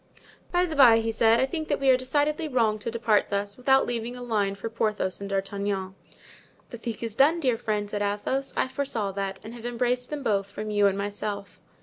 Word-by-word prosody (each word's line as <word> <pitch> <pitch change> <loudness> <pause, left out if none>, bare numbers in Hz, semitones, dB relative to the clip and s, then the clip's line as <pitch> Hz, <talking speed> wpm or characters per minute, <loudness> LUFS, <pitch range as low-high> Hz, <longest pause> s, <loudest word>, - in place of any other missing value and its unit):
"By 355 0 +3
the 320 -3 -5
bye," 245 -5 +8
he 225 0 0
said, 225 +1 +4
"I - - +3
think 315 +2 -4
that 290 - 0
we 270 -1 +4
are - - +6
decidedly 290 +5 0
wrong 225 -6 +1
to 220 - -4
depart 225 -2 +2
thus, 200 0 -1
without 265 +1 +3
leaving 235 0 -3
a 250 - -7
line 205 -4 0
for 200 +3 -5
Porthos 210 -4 -1
and 200 - -5
D'Artagnan." 195 -1 -2 0.8
"The 235 - -8
thing 230 -2 -4
is 225 -2 -4
done, 295 +6 +4
dear 255 -7 +2
friend," 210 -2 -1
said 205 0 -4
Athos; 210 +7 -1
"I - - +2
foresaw 260 -7 -2
that 195 0 -4
and 220 +2 -8
have 235 -1 -10
embraced 245 +1 -1
them 295 -2 -4
both 200 -4 0
from 215 0 -5
you 205 -1 +4
and 195 0 0
myself." 200 -1 -4
225 Hz, 220 wpm, -26 LUFS, 205-255 Hz, 0.8 s, bye